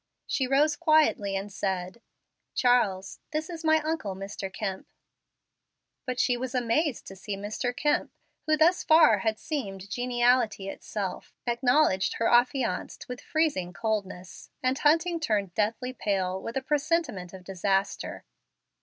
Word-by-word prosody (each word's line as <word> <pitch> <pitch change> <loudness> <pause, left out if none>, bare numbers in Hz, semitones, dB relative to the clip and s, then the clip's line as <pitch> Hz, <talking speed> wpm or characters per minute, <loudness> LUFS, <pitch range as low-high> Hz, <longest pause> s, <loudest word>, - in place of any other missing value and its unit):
She 260 - 0
rose 290 +3 +3
quietly, 310 - +3
and 195 +1 -4
said, 185 +3 -3 0.5
"Charles, 210 -6 +2
this 310 +2 -3
is 330 -1 -7
my 315 0 +4
uncle, 310 -12 -2
Mr. 195 0 -6
Kemp." 190 -1 -4 1.2
But 250 -1 -2
she 250 -1 +3
was 255 +1 -4
amazed 250 +3 0
to 195 - -9
see 195 +1 -5
Mr. 210 +5 -3
Kemp, 295 +4 0 0.4
who 310 0 +3
thus 335 +4 +4
far 315 - +6
had 220 +2 0
seemed 200 - -5
geniality 245 -4 +1
itself, 195 -1 -5
acknowledge 245 -4 +2
her 230 - 0
affianced 245 -4 +1
with 250 0 -7
freezing 285 - 0
coldness, 195 -3 -4
and 255 +2 +1
Hunting 330 +3 +3
turned 205 - -1
deathly 225 +5 -1
pale 190 -5 -1
with 230 +5 -4
a 265 - -2
presentiment 295 - -1
of 190 -1 -11
disaster. 195 +1 -1
235 Hz, 135 wpm, -27 LUFS, 195-290 Hz, 1.2 s, far